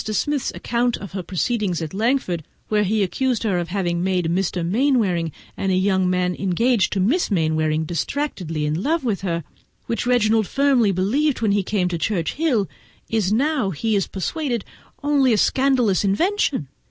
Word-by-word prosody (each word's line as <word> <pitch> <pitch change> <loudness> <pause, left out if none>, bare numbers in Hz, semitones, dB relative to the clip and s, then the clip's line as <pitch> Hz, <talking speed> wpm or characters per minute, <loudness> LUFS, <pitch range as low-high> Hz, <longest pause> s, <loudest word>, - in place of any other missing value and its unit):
Smith's 270 +6 -1
account 240 0 0
of 200 - -9
her 190 - -4
proceedings 185 +1 -1
at 160 0 -5
Langford, 215 - 0 0.3
where 210 -1 +2
he 210 +1 +1
accused 250 +5 -1
her 195 -5 +1
of 170 - -3
having 175 -2 -1
made 185 -2 0
Mr. 180 -2 -1
Mainwaring 200 - +1 0.2
and 195 - -1
a - - +2
young 190 -1 +2
man 180 0 +1
engaged 200 +5 +1
to 200 - -1
Miss 260 - +2
Mainwaring 155 -4 +1
distractedly 170 - -2
in 155 +3 -1
love 320 +6 0
with 220 -6 -1
her, 170 -3 -2 0.4
which 230 +1 -2
Reginald 220 -4 +3
firmly 270 -7 +3
believed 245 +11 +1
when 215 -3 +2
he 200 0 +2
came 190 -1 0
here, 200 - 0 0.4
is 215 -4 +1
now, 265 -1 +1
he 215 +6 -1
is 195 - +1
persuaded, 240 - -3 0.4
only 280 -4 +3
a - - +2
scandalous 255 -6 +2
invention. 270 - +1
205 Hz, 165 wpm, -22 LUFS, 180-245 Hz, 0.4 s, Reginald